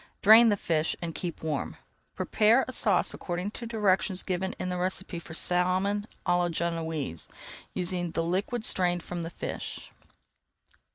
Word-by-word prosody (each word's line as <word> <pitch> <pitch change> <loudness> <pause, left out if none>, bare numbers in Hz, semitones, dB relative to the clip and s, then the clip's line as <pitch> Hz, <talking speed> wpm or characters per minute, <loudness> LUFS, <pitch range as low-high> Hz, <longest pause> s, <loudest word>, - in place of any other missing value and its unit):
Drain 225 +3 +9
the 205 - +2
fish 160 -3 0
and 165 -1 -4
keep 170 -1 -5
warm. 150 -4 -3 0.4
Prepare 225 +4 +3
a - - -4
sauce 205 -7 +2
according 180 +3 -4
to 235 +1 -7
directions 195 -4 +1
given 190 0 -2
in 185 - -3
the 180 - -2
recipe 185 -1 -2
for 160 -1 -9
Salmon 185 +4 +2 0.2
à 175 -1 +3
la 175 0 +1
Genoise, 160 - -3 0.5
using 180 -1 -1
the 165 0 -1
liquid 200 +7 -1
strained 175 -2 +1
from 175 -1 -5
the 165 - -4
fish. - - -5
180 Hz, 155 wpm, -28 LUFS, 170-200 Hz, 0.5 s, Drain